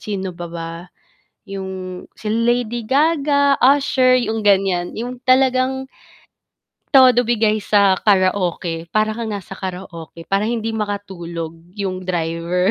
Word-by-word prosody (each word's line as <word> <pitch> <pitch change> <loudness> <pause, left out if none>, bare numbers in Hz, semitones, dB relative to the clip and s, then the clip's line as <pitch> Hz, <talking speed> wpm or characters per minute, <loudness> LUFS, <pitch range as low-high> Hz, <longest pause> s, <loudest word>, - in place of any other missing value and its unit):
sino 195 -3 -4
pa 175 0 -6
ba? 165 0 -6 0.7
'Yung 190 -2 -7
si 215 - -8
Lady 235 0 0
Gaga, 285 -1 +2
Usher, 260 -1 +4
'yung 225 -3 0
ganiyan, 190 -3 +2
'yung 245 +2 -5
talagang 260 0 +2 1.1
Todo 250 -3 +6
bigay 220 -2 +2
sa 200 -2 +3
karaoke, 185 -4 +1
para 215 0 +2
kang 230 +1 -4
nasa 195 -1 -8
karaoke, 180 -3 -7
para 195 +2 +1
hindi 225 -1 -2
makatulog 190 -6 -4 0.2
'yung 185 -3 -4
driver. 170 +2 0
205 Hz, 120 wpm, -19 LUFS, 185-245 Hz, 1.1 s, Todo